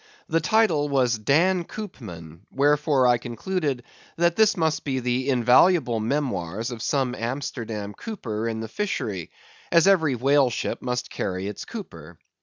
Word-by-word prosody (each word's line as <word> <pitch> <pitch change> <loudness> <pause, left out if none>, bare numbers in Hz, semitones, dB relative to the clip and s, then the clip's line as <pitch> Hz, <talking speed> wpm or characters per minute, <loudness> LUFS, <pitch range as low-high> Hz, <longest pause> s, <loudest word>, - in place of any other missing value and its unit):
The 165 +1 +1
title 160 -6 +2
was, 125 -5 +2
"Dan 170 - +2
Coopman," 90 - -9
wherefore 145 -1 +2
I 120 -1 +4
concluded 135 - -3 0.3
that 170 0 +2
this 220 -2 +4
must 160 -2 0
be 135 -2 -1
the 125 +2 -1
invaluable 125 +1 +4
memoirs 115 - -2
of 120 -2 -7
some 130 0 0
Amsterdam 115 -4 -4
cooper 115 - -5
in 110 -1 -3
the 110 - -5
fishery, 105 - -3 0.4
as 170 0 +5
every 160 -9 +4
whale 135 +2 +3
ship 120 - -3
must 125 -1 -3
carry 95 0 -3
its 105 - -6
cooper. 85 - -9
130 Hz, 145 wpm, -24 LUFS, 115-160 Hz, 0.4 s, as